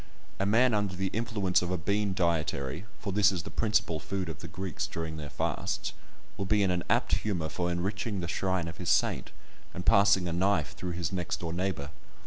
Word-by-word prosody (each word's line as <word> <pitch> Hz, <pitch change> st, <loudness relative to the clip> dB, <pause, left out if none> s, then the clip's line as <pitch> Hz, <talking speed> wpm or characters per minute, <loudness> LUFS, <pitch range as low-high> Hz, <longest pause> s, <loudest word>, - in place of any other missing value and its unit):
A 100 Hz, -, +1 dB
man 120 Hz, +4 st, +4 dB
under 105 Hz, -3 st, 0 dB
the 95 Hz, +1 st, -1 dB
influence 105 Hz, -5 st, +1 dB
of 90 Hz, -, -2 dB
a 90 Hz, -, 0 dB
bean 100 Hz, +3 st, 0 dB
dietary 80 Hz, -1 st, 0 dB
(for 100 Hz, -2 st, -4 dB
this 100 Hz, 0 st, +5 dB
is 90 Hz, -4 st, -3 dB
the -, -, -8 dB
principal 105 Hz, -7 st, +1 dB
food 90 Hz, +3 st, -3 dB
of 80 Hz, -, -6 dB
the -, -, -7 dB
Greeks 95 Hz, -2 st, -3 dB
during 80 Hz, -1 st, -4 dB
their 75 Hz, -2 st, -6 dB
fasts) -, -, -2 dB, 0.4 s
will 100 Hz, -, -2 dB
be 105 Hz, +1 st, +3 dB
in 95 Hz, -, +2 dB
an 90 Hz, -1 st, 0 dB
apt -, -, +3 dB
humour 90 Hz, -7 st, -2 dB
for 90 Hz, +3 st, -1 dB
enriching 100 Hz, +4 st, -2 dB
the 85 Hz, -, -3 dB
shrine 95 Hz, 0 st, 0 dB
of 80 Hz, 0 st, -7 dB
his 90 Hz, -, -3 dB
saint, -, -, +2 dB, 0.5 s
and 90 Hz, -, -5 dB
passing 100 Hz, -2 st, +5 dB
a 85 Hz, -, -1 dB
knife 90 Hz, -5 st, +2 dB
through 90 Hz, -1 st, -4 dB
his 85 Hz, -2 st, -2 dB
next 90 Hz, -1 st, -2 dB
door 85 Hz, -1 st, -3 dB
neighbour. 85 Hz, -6 st, -2 dB
90 Hz, 210 wpm, -30 LUFS, 85-100 Hz, 0.5 s, this